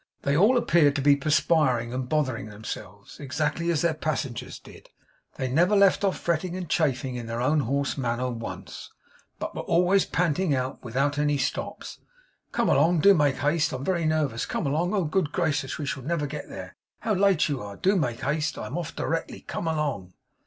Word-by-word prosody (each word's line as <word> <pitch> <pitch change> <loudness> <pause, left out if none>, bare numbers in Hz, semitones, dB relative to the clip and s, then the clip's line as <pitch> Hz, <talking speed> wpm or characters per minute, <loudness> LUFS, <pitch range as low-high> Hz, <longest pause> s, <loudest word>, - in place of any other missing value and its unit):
They 140 - +1
all 210 - +5
appeared 155 -11 +3
to 140 - 0
be 145 0 +6
perspiring 140 -4 +2
and 130 0 -3
bothering 130 -8 0
themselves, 105 +1 -9
exactly 150 +4 -1
as 165 -2 +1
their 170 -1 +2
passengers 150 -5 -3
did; - - -15 0.5
they 130 - -2
never 170 +10 +3
left 200 0 +4
off 195 -2 +1
fretting 170 +1 -1
and 185 -2 -5
chafing, 130 -5 0
in 120 -1 -6
their 115 +1 -3
own 145 +5 +2
hoarse 140 +2 -1
manner, 125 0 -1
once; 115 -1 -7 0.5
but - - -5
were - - -3
always 180 +3 +3
panting 170 -2 +1
out, 130 0 -3
without 135 +4 0
any 145 -1 +2
stops, 130 - -4 0.5
'Come - - 0
along 170 -1 +4
do 200 +3 +7
make 145 -6 +2
haste 150 +2 +1
I'm 130 +1 -4
very 175 -3 0
nervous 150 -7 0
come - - -2
along 160 +6 0
oh 195 - +2
good 155 -1 0
gracious 145 -6 -1
we 150 - -4
shall 135 - -3
never 150 +2 -1
get 140 - -6
there - - -8 0.3
how 215 0 0
late 195 -3 +3
you 140 -3 -2
are 100 -1 -7
do 195 +2 +2
make 125 -10 -1
haste 155 +3 -1
I'm 160 - -4
off 165 -1 -6
directly 165 +1 -3
come 165 - -5
along! 145 - -2
150 Hz, 190 wpm, -26 LUFS, 130-170 Hz, 0.5 s, do